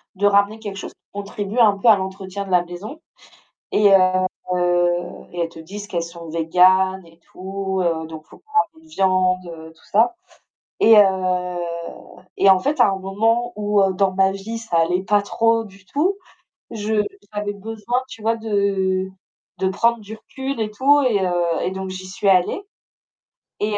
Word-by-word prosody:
de 205 - 0
ramener 200 +2 +3
quelque 205 -3 -7
chose - - -7
qui - - -58
contribue 205 +2 -4
un 210 -4 +5
peu 200 - -1
à 215 - +8
l'entretien 190 0 -5
de 195 - -10
la 180 -1 +3
maison 200 - -8 0.7
et 205 -1 +4
heu 185 -1 +4 1.1
et 175 - -5
elles 170 - 0
te 165 - -14
disent 200 +6 -8
qu'elles 170 -3 -2
sont 170 0 -10
végans 185 +3 +3
et 165 0 -20
tout, 190 +2 -5
heu, 165 -2 -1
donc 160 -1 -9
il - - -35
faut - - -16
pas 435 - -26 0.2
ramener 320 0 -21
de - - -20
viande, 185 - 0
tout 160 - -25
ça 225 - +3 0.7
et 225 0 +7
heu 185 -2 +2 0.8
et 195 - +5
en 190 -1 +6
fait, 290 +6 0
à - - +6
un 195 - -2
moment 225 +5 0
où, 205 -1 +1
heu, 195 -1 +2
dans 190 0 +1
ma 190 0 +3
vie 205 +4 -6
ça 220 -7 -1
allait 175 +3 +1
pas 205 +1 +2
trop 230 +2 +1
du 195 -2 -16
tout, 340 - 0 0.5
je 215 -1 0 0.3
j'avais 205 0 -3
besoin, 225 +4 -3
tu 225 - -11
vois, 225 +1 +1
de 195 -3 0 0.5
de 190 0 0
prendre 235 +4 +1
du 215 +1 -9
recul 265 +2 -5
et 215 -1 -2
tout 280 +6 +4
et 235 -6 +2
heu 180 - -1 0.3
et - - -1
donc, 190 0 -5
j'y 185 0 -7
suis 195 +2 -1
allée 185 - +2 1.0
et 210 +1 -1
heu, - - 0
195 Hz, 185 wpm, -21 LUFS, 185-215 Hz, 1.1 s, à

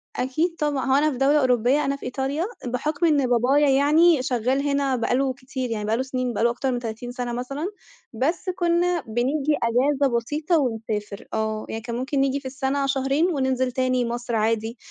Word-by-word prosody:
أكيد 310 +7 -1
طبعًا. 295 -3 0
هو 265 - +3
أنا 300 +2 +3
في 255 - -5
دولة 285 +3 +4
أوروبية 255 +3 +2
أنا 275 - 0
في 275 - -10
إيطاليا. 270 +5 -2 0.2
بحُكم 290 +7 -1
إن 290 -5 +3
بابايا 260 +5 +3
يعني 295 +3 +4
شغّال 260 +3 0
هنا 280 -2 +1
بقى 240 0 0
له 265 0 +1
كتير 255 -1 -5
يعني، 210 -2 -3
بقى 220 +2 +1
له 260 - 0
سنين 255 -2 -2
بقى 220 - -1
له 235 - +5
أكتر 255 +2 -2
من 245 - -1
30 235 +1 -6
سنة 245 -1 -4
مثلًا. 275 +7 -3 0.5
بس 310 - -1
كُنّا 345 0 +1
بنيجي 270 +6 0
أجازة 260 +2 +2
بسيطة 300 +8 0
ونسافر. 225 -5 -3
آه، 220 0 -2
يعني 225 - -4
كان 235 +1 -5
ممكن 260 +3 -2
نيجي 275 +1 +1
في 275 - -21
السنة 270 +1 -1
شهرين 275 +4 +1
وننزل 260 -2 0
تاني 255 -1 +1
مصر 240 0 -3
عادي. 225 +2 0
260 Hz, 195 wpm, -24 LUFS, 240-285 Hz, 0.5 s, له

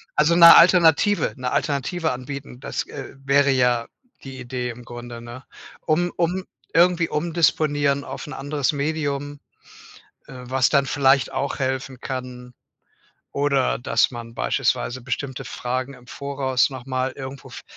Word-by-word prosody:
Also, 155 +3 +3
'ne 170 -1 +10
Alternative 170 +1 +5
'ne 125 -1 -3
Alternative 155 +4 -1
anbieten, 130 0 -7
das, - - -4
äh, - - -8
wäre 140 +1 +4
ja 125 -3 +2 0.4
die 135 -1 -9
Idee 125 0 -4
im 120 +1 -9
Grunde, 120 0 -9
ne? 120 +2 -10 0.4
Um 175 +2 0
um 180 +2 -1 0.3
irgendwie 170 0 +3
umdisponieren 150 -3 +1
auf - - -7
'n 145 - -7
anderes 140 0 -1
Medium, 145 -1 -3 0.9
äh, - - -11
was 130 +1 +2
dann 140 -2 +3
vielleicht 135 -1 +2
auch 135 +2 -3
helfen 130 -1 -3
kann. 125 -1 -7 0.8
Oder 140 -2 +1
dass 120 - +2
man 115 -2 -9
beispielsweise 125 +1 -1
bestimmte 130 +1 -4
Fragen 130 +2 -4
im 125 -1 -17
Voraus 135 -1 -1
noch 130 -2 -9
mal 130 0 -2
irgendwo 135 0 -9
f - - -10
135 Hz, 140 wpm, -22 LUFS, 125-150 Hz, 0.9 s, ne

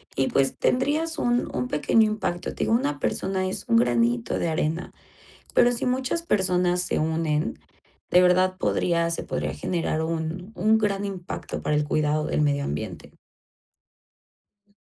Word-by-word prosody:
y 135 - +1
pues 135 -1 +1
tendrías 310 +6 +1
un 240 0 +1
un 125 0 -1
pequeño 185 +9 +3
impacto. 190 -5 -2
Te - - -1
digo, - - +1
una 145 - 0
persona 190 0 -1
es 185 - -4
un 230 - +4
granito 120 - +1
de 170 - 0
arena. 160 +2 -2 0.6
Pero 245 0 +5
si 235 - -2
muchas 260 +6 -1
personas 180 - +1
se - - 0
unen, 155 -1 -1 0.5
de 180 - +6
verdad 185 +1 +3
podría 170 -2 +1
se 165 - -2
podría 75 +1 -3
generar 160 - -2
un 165 +4 -4
un 220 +4 +3
gran 205 -2 0
impacto 190 -3 -5
para 150 - 0
el 150 - +1
cuidado 150 +1 0
del - - 0
medio 140 -1 +1
ambiente. 75 - -5 1.5
Ujú. 205 - -34
180 Hz, 155 wpm, -25 LUFS, 150-210 Hz, 1.5 s, de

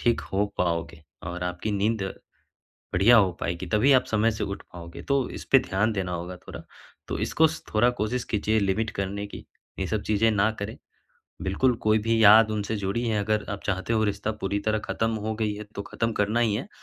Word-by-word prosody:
ठीक 120 -1 +2
हो 100 +2 +2
पाओगे। 85 -2 -1 0.2
और 90 +1 -5
आपकी 90 +4 -3
नींद 105 +2 0 0.9
बढ़िया 110 +7 +6
हो 95 -4 +4
पाएगी, 85 +2 -3
तभी 110 +9 +3
आप 130 - +4
समय 110 +1 +2
से 110 - -3
उठ 100 0 -4
पाओगे, 85 -1 -9
तो 140 -2 0
इस - - -7
पे 135 - +8
ध्यान 105 -1 0
देना 95 -3 -2
होगा 90 +1 -5
थोड़ा। - - -10 0.4
तो - - -3
इसको 160 0 +3
स 160 - -7
थोड़ा 120 +3 +4
कोशिश 115 +3 -1
कीजिए 110 +1 +1
लिमिट 100 +3 0
करने 100 +1 -3
की, - - -10 0.3
ये - - -1
सब - - -1
चीज़ें 110 +1 +2
ना 105 +1 +3
करें। 100 +2 -5 0.7
बिल्कुल 120 +7 +2
कोई 110 0 +4
भी 115 0 +2
याद 110 +2 +8
उनसे 105 0 -2
जुड़ी 100 +4 -2
हैं 110 -2 +1
अगर 105 +1 0
आप 100 -1 -4
चाहते 95 +3 -1
हो 110 -1 +2
रिश्ता 105 +1 -1
पूरी 100 +1 -1
तरह 110 +1 0
ख़त्म 115 0 -1
हो 110 - -1
गई 110 -2 0
है 105 - -7
तो 100 - -3
ख़त्म 115 +2 -2
करना 105 +3 +1
ही 110 -3 +2
है, 130 - -4
105 Hz, 210 wpm, -26 LUFS, 100-115 Hz, 0.9 s, पे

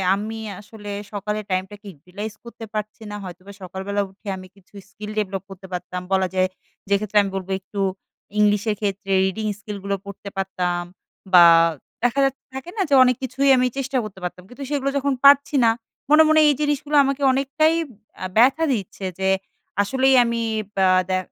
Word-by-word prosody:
আমি 220 +2 -5 0.2
আসলে 205 0 -10 0.2
সকালের 210 +1 -3
টাইমটাকে 195 +3 -3
utilize 205 +8 -7
করতে 235 -1 -9
পারছি 215 +1 -5
না - - -5
হয়তোবা 185 +2 -10
সকালবেলা 190 +3 -3
উঠে 200 +2 -18
আমি 185 - -10
কিছু 195 +1 -25 0.2
skill 210 +1 -8
develop 195 -2 -3
করতে 190 0 -11
পারতাম, 180 0 -4
বলা 190 -1 +2
যায় 185 0 +2 0.4
যে 200 - +4
ক্ষেত্রে 210 0 -2
আমি 195 - -4
বলবো 190 0 -4
একটু 200 +1 -8 0.6
ইংলিশের 210 +1 +2
ক্ষেত্রে 195 -1 -3
reading 210 +3 -2
skill 205 0 -7
গুলো 200 0 -1
পড়তে 200 0 -8
পারতাম। 180 -2 -1 0.5
বা 175 -1 +10 0.6
দেখা 245 +3 +2
যাচ্ছে 270 0 -3
থাকে 265 +5 -7
না? 435 - -6
ঠিক - - +2
আছে 290 - -2
অনেক 250 -1 +3
কিছুই 270 +2 +1
আমি 250 0 +3
চেষ্টা 270 0 -1
করতে 205 -3 -9
পারতাম। 180 0 -5
কিন্তু 275 +3 -9
সেগুলো 275 -1 0
যখন 280 0 0
পারছি 285 +1 +6
না, 225 - +6 0.4
মনে, 310 +1 +7
মনে 315 0 +5
এই - - +4
জিনিসগুলো 295 0 0
আমাকে 275 +1 -1
অনেকটাই 280 +4 +2 0.4
অ্যা 185 - -4
ব্যথা 270 +7 +5
দিচ্ছে 195 -2 -5
যে 190 - +1 0.5
আসলেই 265 +5 +3
আমি 235 0 -1 0.3
বা 190 -1 +3 0.2
দে 185 - +2
210 Hz, 175 wpm, -22 LUFS, 190-265 Hz, 0.6 s, বা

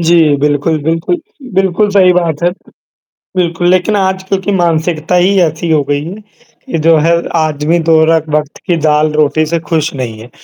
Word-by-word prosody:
जी, 165 -3 +3
बिल्कुल, 145 +2 0
बिल्कुल, 165 - -1 0.4
बिल्कुल 190 +2 +1
सही 185 -2 +4
बात 170 -3 -1
है। 175 - +2 0.9
बिल्कुल, 175 -1 0
लेकिन 185 +3 +1
आज 190 -1 -1
क्योंकि 195 +1 -1
मानसिकता 170 -2 0
ही 185 +3 +3
ऐसी 160 +1 -2
हो 150 -2 +3
गई 145 +1 -1
है, 175 - -6 0.6
कि 165 - -1
जो 165 +1 +3
है 165 +3 +2 0.2
आदमी 155 +1 0
दो 160 -1 +5
रख 160 -1 0
वक़्त 150 0 -2
की 175 -3 +1
दाल-रोटी 150 0 +2
से 170 +2 -1
खुश 160 -1 0
नहीं 120 -5 -5
है। 120 +3 -12
165 Hz, 175 wpm, -12 LUFS, 150-175 Hz, 0.9 s, दो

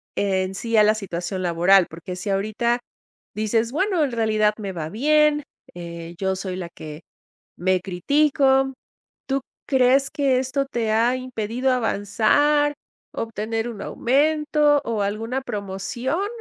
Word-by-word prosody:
en 190 -1 0
sí 230 +3 -1
a 215 - +7
la 210 +1 +5
situación 185 -3 -4
laboral? 180 +2 +4
Porque 170 +3 -8
si 185 +3 -5
ahorita 215 +5 0 0.6
dices 220 +2 0
bueno, 365 +2 +1
en 280 - -1
realidad 215 -2 +2
me 200 -2 -4
va 160 -3 -4
bien, 300 - +3 0.3
eh, 170 -1 -8
yo 190 -1 0
soy 185 -1 -4
la 180 -2 -5
que 155 -2 -10 0.6
me 185 0 +1
critico. 270 - +2 0.5
¿Tú 275 0 0 0.3
crees 265 +1 +3
que 280 -4 +1
esto 265 +2 -1
te 235 -4 -1
ha 230 +3 +3
impedido 255 0 -2
avanzar, 250 +6 +2 0.4
obtener 225 +1 -3
un 215 -4 -8
aumento 295 +2 +2
o 225 -3 -1
alguna 225 +6 -2
promoción? 240 - -3
225 Hz, 135 wpm, -23 LUFS, 195-270 Hz, 0.6 s, a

